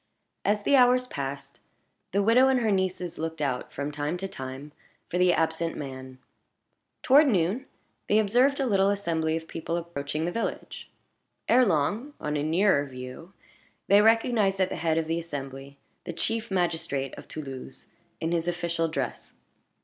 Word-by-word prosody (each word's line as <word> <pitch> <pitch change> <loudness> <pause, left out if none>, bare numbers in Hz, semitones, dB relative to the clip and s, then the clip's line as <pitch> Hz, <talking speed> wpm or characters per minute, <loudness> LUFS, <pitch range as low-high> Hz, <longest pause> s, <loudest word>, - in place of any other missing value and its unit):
As 205 0 +1
the 280 - +4
hours 250 -1 +5
passed, 140 - -6 0.5
the 200 +2 +2
widow 240 +5 +5
and 260 -2 +3
her 220 -2 +2
nieces 185 -2 -1
looked 160 0 -4
out, 135 -4 -2
from 145 +1 -4
time 145 +3 -2
to 195 +2 -4
time, 135 -2 -8 0.4
for 180 - 0
the 180 0 +5
absent 165 0 0
man. 130 -2 -7 0.9
Toward 285 +3 +6
noon 210 +4 +1 0.4
they 210 - +4
observed 245 +7 +3
a 270 - +1
little 195 -4 +3
assembly 165 -5 0
of 160 0 -8
people 165 +1 -3
approaching 155 -2 -3
the 175 - -1
village. 230 +4 -4 0.6
Ere 250 0 +5
long, 205 - 0
on 150 0 -2
a 145 - 0
nearer 160 0 +3
view, 130 +7 -9 0.5
they 200 +1 +6
recognized 220 -3 +3
at 185 - +2
the - - -4
head 160 0 0
of 165 - +1
the 165 +1 -1
assembly 140 -3 -7 0.3
the 175 - -5
chief 225 +6 -2
magistrate 165 -7 -1
of - - -11
Toulouse, 130 - -8 0.3
in 165 - -2
his 170 0 0
official 170 -1 -1
dress. 140 -6 -4
170 Hz, 165 wpm, -27 LUFS, 145-205 Hz, 0.9 s, Toward